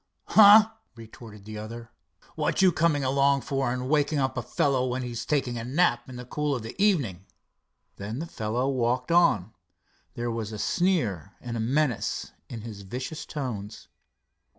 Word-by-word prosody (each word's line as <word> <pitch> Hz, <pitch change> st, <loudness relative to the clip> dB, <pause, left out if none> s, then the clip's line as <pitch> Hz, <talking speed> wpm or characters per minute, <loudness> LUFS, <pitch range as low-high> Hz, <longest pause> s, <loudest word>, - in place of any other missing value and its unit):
"Huh!" 215 Hz, +1 st, +8 dB, 0.2 s
retorted 110 Hz, -2 st, -12 dB
the 110 Hz, 0 st, -7 dB
other, 115 Hz, +2 st, -8 dB, 0.4 s
"what -, -, 0 dB
you 185 Hz, -, +6 dB
coming 155 Hz, -3 st, +1 dB
along 140 Hz, +1 st, +2 dB
for 135 Hz, -3 st, -1 dB
and 125 Hz, 0 st, -3 dB
waking 150 Hz, +1 st, +2 dB
up 135 Hz, -1 st, 0 dB
a 120 Hz, -, -1 dB
fellow 130 Hz, +2 st, 0 dB
when 130 Hz, +1 st, -2 dB
he's 120 Hz, -1 st, -5 dB
taking 130 Hz, -5 st, 0 dB
a -, -, -5 dB
nap 145 Hz, +4 st, +1 dB
in 130 Hz, -, -9 dB
the 125 Hz, 0 st, -8 dB
cool 150 Hz, +2 st, -1 dB
of 120 Hz, -, -5 dB
the 115 Hz, -, -7 dB
evening?" 120 Hz, -, +1 dB, 0.7 s
Then 105 Hz, +4 st, -5 dB
the 160 Hz, -, -4 dB
fellow 120 Hz, -3 st, -2 dB
walked 125 Hz, 0 st, 0 dB
on. 140 Hz, -, +3 dB, 0.6 s
There 120 Hz, 0 st, -2 dB
was 115 Hz, -2 st, -4 dB
a 110 Hz, -, -6 dB
sneer 115 Hz, -, 0 dB
and 120 Hz, -1 st, -6 dB
a -, -, -2 dB
menace 130 Hz, +1 st, -1 dB, 0.2 s
in 115 Hz, -, -7 dB
his 105 Hz, -2 st, -8 dB
vicious 130 Hz, +10 st, -6 dB
tones. 115 Hz, -8 st, -6 dB
125 Hz, 170 wpm, -27 LUFS, 115-145 Hz, 0.7 s, Huh